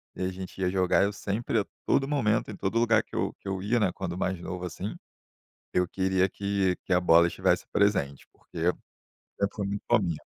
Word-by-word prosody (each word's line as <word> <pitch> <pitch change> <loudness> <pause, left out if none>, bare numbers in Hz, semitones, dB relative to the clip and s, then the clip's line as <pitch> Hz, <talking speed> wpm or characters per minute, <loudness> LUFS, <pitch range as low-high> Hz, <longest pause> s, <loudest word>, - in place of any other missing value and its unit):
e - - -3
a 90 - 0
gente 95 +1 -8
ia 95 - +1
jogar. 95 0 +3
Eu 100 - 0
sempre 105 +3 -1
a 100 - -1 0.2
todo 135 - +2
momento, 115 -8 +1
em 105 - -7
todo 100 +5 0
lugar 115 -2 +4
que - - -13
eu - - -1
que - - -12
eu 95 -1 -2
ia, 110 +5 +1
né, 100 -5 +2
quando 90 -2 -4
mais 95 -1 -1
novo, 90 0 -5
assim, 90 +4 -5 0.8
eu 90 -1 +2
queria 95 0 +1
que 100 -2 0
que - - -3
a 90 - +5
bola 85 -1 +6
estivesse 85 - +1
presente, 95 -10 +1
porque - - -13 0.8
sempre 100 0 0
fui 100 -2 -2
muito 100 0 -3
fominha. 90 -9 +2
95 Hz, 210 wpm, -28 LUFS, 90-105 Hz, 0.8 s, bola